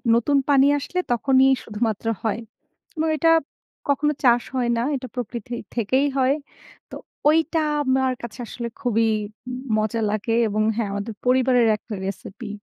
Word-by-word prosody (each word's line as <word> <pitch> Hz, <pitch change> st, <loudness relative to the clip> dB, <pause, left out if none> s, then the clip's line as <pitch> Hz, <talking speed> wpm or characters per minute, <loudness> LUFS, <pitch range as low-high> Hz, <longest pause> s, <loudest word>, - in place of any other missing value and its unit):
নতুন 280 Hz, +5 st, +2 dB
পানি 275 Hz, -1 st, +6 dB
আসলে 360 Hz, +6 st, -3 dB
তখনই 265 Hz, +2 st, +4 dB, 0.2 s
শুধুমাত্র 220 Hz, 0 st, -2 dB, 0.2 s
হয়। 220 Hz, 0 st, 0 dB, 0.6 s
এবং 320 Hz, 0 st, 0 dB
এটা 330 Hz, +3 st, +4 dB, 0.6 s
কখনো 295 Hz, +1 st, +2 dB
চাষ 240 Hz, -2 st, +5 dB
হয় 245 Hz, -2 st, +1 dB
না। -, -, +1 dB
এটা 255 Hz, -1 st, -5 dB
প্রকৃতি 240 Hz, -1 st, -5 dB, 0.2 s
থেকেই 255 Hz, +4 st, +2 dB
হয়। 265 Hz, +1 st, +3 dB, 0.6 s
তো -, -, -7 dB, 0.3 s
ঐটা 320 Hz, +1 st, +2 dB, 0.2 s
আমার 260 Hz, -1 st, +2 dB
কাছে 235 Hz, +1 st, -8 dB
আসলে 235 Hz, +1 st, -5 dB
খুবই 230 Hz, -3 st, +2 dB, 0.7 s
মজা 215 Hz, +1 st, 0 dB
লাগে 215 Hz, +2 st, -1 dB
এবং 215 Hz, 0 st, -1 dB
হ্যাঁ 225 Hz, -3 st, -1 dB
আমাদের 200 Hz, +3 st, -4 dB
পরিবারের 250 Hz, -1 st, +4 dB
একটা 215 Hz, -, -10 dB
রেসিপি। 200 Hz, +3 st, -6 dB
245 Hz, 145 wpm, -23 LUFS, 220-265 Hz, 0.7 s, পানি